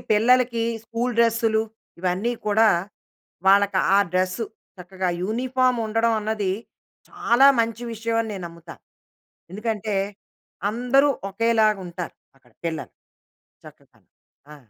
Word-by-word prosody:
పిల్లలకి 235 +2 +3 0.2
స్కూల్ 235 +2 -2
డ్రెస్సులు, 225 -1 +3 0.4
ఇవన్నీ 185 +6 0
కూడా 220 +2 +4 0.8
వాళ్ళకి 200 -1 +4 0.2
ఆ - - +6
డ్రెస్సు 185 +4 0 0.3
చక్కగా 185 +1 -4 0.2
యూనిఫార్మ్ 255 +3 +1
ఉండడం 225 +1 +1
అన్నది 210 -3 -1 0.6
చాలా 240 +4 +3
మంచి 230 +1 -2
విషయం 225 +1 -2
అని 225 - -6
నేను 185 - -6
నమ్ముతాను. 170 0 -13 0.7
ఎందుకంటే, 215 0 -3 0.8
అందరూ 250 +5 +3 0.2
ఒకేలాగుంటారు 210 -5 0 0.2
అక్కడ 125 -3 -27
పిల్లలు. 160 -1 -4 0.7
చక్కగా - - -17 0.5
ఆ! - - -10
220 Hz, 100 wpm, -23 LUFS, 190-235 Hz, 0.8 s, ఆ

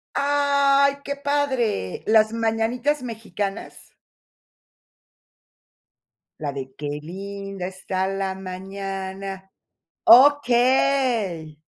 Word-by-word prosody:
¡Ay!, 280 -1 +3
qué 280 - -4
padre. 270 - -1
Las 220 0 +4
mañanitas 230 +5 0
mexicanas. 210 -3 -6 2.5
La 145 -3 -3
de: 135 -1 -7
"Qué 145 0 -5
linda 195 +2 -7
está 190 0 -3
la 195 0 -2
mañana". 190 0 -7 0.5
Okey. 245 - +4
205 Hz, 70 wpm, -23 LUFS, 190-265 Hz, 2.5 s, Las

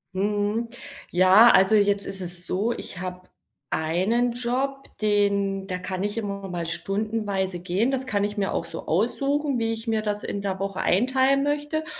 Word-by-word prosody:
Mhm. 205 +3 0 0.4
Ja, 185 +6 +7
also 190 +3 +5
jetzt 200 -1 +2
ist 195 -1 -5
es 175 0 -3
so, 210 +7 0
ich 180 - -7
habe 185 0 -7 0.4
einen 195 +10 +1
Job, 260 +3 -2 0.2
den 200 -2 +1
da 180 -1 -3
kann 185 +1 -4
ich 205 +2 -2
immer 200 -3 -4
mal 170 -2 -3
stundenweise 195 +1 -2
gehen, 190 +7 0
das 265 -1 -2
kann 205 -5 0
ich 205 +1 -4
mir 200 -2 -1
auch 165 - -2
so 165 - -7
aussuchen, 275 - +1
wie 225 0 0
ich 225 +1 -5
mir 220 -1 +1
das 210 -1 -2
in 200 - -4
der 195 -1 -3
Woche 195 -1 -3
einteilen 260 +6 +3
möchte. 295 +2 -1
205 Hz, 175 wpm, -25 LUFS, 190-235 Hz, 0.4 s, Ja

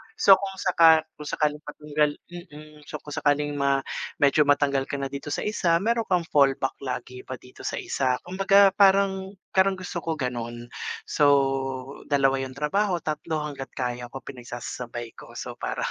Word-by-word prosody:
So 195 -1 +6
kung 195 -1 -5
saka 165 -4 +5 0.2
kung 150 - -7
sakaling 150 0 0
matanggal 150 0 0 0.2
mm, 155 -4 -12
so - - -7
kung 150 - -10
sakaling 145 0 +1
ma 140 0 +2 0.4
medyo 145 +1 +5
matanggal 140 -1 +2
ka - - -10
na 135 - -2
dito 140 +1 -5
sa - - -2
isa, 170 -5 +1
mayro'n 230 +2 +1
kang 180 -2 +2
fallback 135 -2 +2
lagi 125 0 -5
pa - - -6
dito 125 - -13
sa - - -2
isa. 130 -2 -1
Kumbaga 195 +2 +4
parang 195 -1 +3 0.2
parang 190 +1 +3
gusto 185 -2 -5
ko 165 - 0
gano'n. 120 -4 -5 0.4
So 145 - +2 0.8
2 135 -2 +2
'yong 130 0 -5
trabaho, 180 +5 0
3 155 0 -3
hangga't 140 -3 -6
kaya 125 -1 -3
ko 135 - -6
pinagsasasabay 120 -2 -7
ko. - - -12
So - - -7
para - - -4
150 Hz, 165 wpm, -25 LUFS, 135-180 Hz, 0.8 s, So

